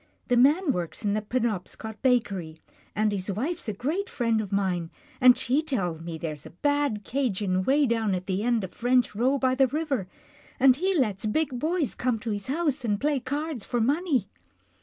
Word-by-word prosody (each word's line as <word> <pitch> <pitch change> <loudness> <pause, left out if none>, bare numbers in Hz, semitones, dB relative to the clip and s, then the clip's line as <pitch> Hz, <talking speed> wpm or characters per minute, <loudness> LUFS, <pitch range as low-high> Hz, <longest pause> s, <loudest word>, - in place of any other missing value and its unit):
The 245 - +4
man 290 +7 +4
works 175 +2 -4
in 200 - +2
the 215 - 0
Penobscot 220 -1 -3
Ba 250 -2 +5
kery, 180 -8 -7 0.4
and 215 0 +2
his 200 0 -2
wife's 275 - -3
a - - -2
great 325 - -2
friend 230 - 0
of 205 - -7
mine, 185 -4 0 0.3
and 250 -1 +8
she 260 +3 +1
tells 180 - -2
me 165 -1 -6
there's 155 -3 -5
a 170 - -17
bad 285 -8 +1
'Cajien 205 -8 0
way 285 +2 +4
down 225 -5 +1
at 180 0 -4
the 190 +1 -1
end 235 -2 +1
of 185 - -6
French 245 -1 +2
Row 255 +6 +2
by 260 -1 +2
the 265 0 +4
river, 275 - -2 0.5
and 260 -1 +6
he 380 +4 +1
lets 215 - 0
big 260 +2 0
boys 315 - 0
come 245 -2 0
to 220 +1 -4
his 205 -1 -3
house 290 -1 0
and 210 -3 0
play 290 +1 +1
cards 285 -1 -3
for 240 - -1
money." 275 - +1
240 Hz, 200 wpm, -26 LUFS, 200-280 Hz, 0.5 s, and